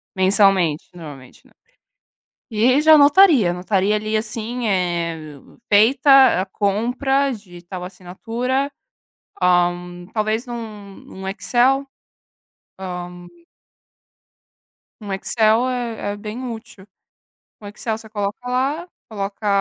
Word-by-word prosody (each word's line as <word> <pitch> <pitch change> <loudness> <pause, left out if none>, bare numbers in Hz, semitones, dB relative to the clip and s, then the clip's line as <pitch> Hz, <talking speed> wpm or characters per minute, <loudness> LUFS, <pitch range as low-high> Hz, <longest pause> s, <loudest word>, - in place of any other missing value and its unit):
mensalmente, 190 -4 +3
normalmente, 145 -6 -12
né. - - -27 1.0
E 240 +5 +3
já 315 +1 +7
anotaria, 290 - +6
anotaria 190 +3 0
ali 215 +1 -2
assim, 230 +2 -3
eh, 170 -5 -2 0.4
feita 260 +2 +5
a 190 - -2
compra 245 +8 0
de 190 -6 -11
tal 180 0 -7
assinatura, 225 +9 -3 0.7
hã, 175 0 +1
talvez 215 +3 -1
num 215 -5 -8
num 190 0 -11
Excel? 255 +7 +1 0.9
Hã 180 -1 -7 1.8
um 205 -2 -7
Excel 220 +4 +2
é 235 -4 -3
é - - -8
bem 215 +4 -7
útil. 220 -4 -11 0.8
Um 205 - -9
Excel 215 +2 -4
você 220 -1 -13
coloca 205 -1 -3
lá, 275 +7 -1 0.2
coloca, 200 0 -5
210 Hz, 105 wpm, -20 LUFS, 185-245 Hz, 1.8 s, já